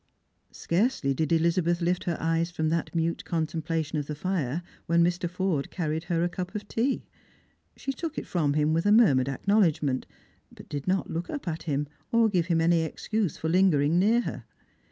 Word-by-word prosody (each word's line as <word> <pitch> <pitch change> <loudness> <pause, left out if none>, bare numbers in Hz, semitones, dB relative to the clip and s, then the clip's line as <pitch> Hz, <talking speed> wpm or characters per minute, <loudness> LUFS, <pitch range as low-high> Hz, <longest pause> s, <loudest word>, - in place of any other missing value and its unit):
Scarcely 170 - 0
did 155 +3 -1
Elizabeth 170 +1 +2
lift 175 +1 0
her 170 -2 -1
eyes 165 +1 0
from 160 -2 -1
that 165 +1 -2
mute 165 0 0
contem 160 -1 -2
plation 160 -1 -2
of 145 - -5
the 150 - -4
fire 165 -2 -2 0.2
when 170 +1 +4
Mr. 175 0 0
Forde 180 -5 -1
carried 160 -2 -3
her 170 -1 0
a - - +2
cup 180 +3 -6
of 210 0 -5
tea. 250 +6 -1 0.7
She 270 - -3
took 315 +3 -5
it - - -3
from 155 -5 0
him 150 +1 +2
with 165 +4 +1
a - - +5
murmured 140 - +5
acknowledgment, 155 -4 +1 0.4
but - - -14
did 145 +1 -5
not 190 +1 0
look 170 +2 -3
up 290 -9 -5
at 165 -1 -3
him, 145 0 0 0.2
or 230 -1 +4
give 175 -4 +1
him 165 -2 +2
any 165 0 +3
excuse 195 +3 -2
for 160 - -3
lingering 170 -3 +3
near 225 +5 +4
her. - - -5
170 Hz, 195 wpm, -27 LUFS, 155-185 Hz, 0.7 s, a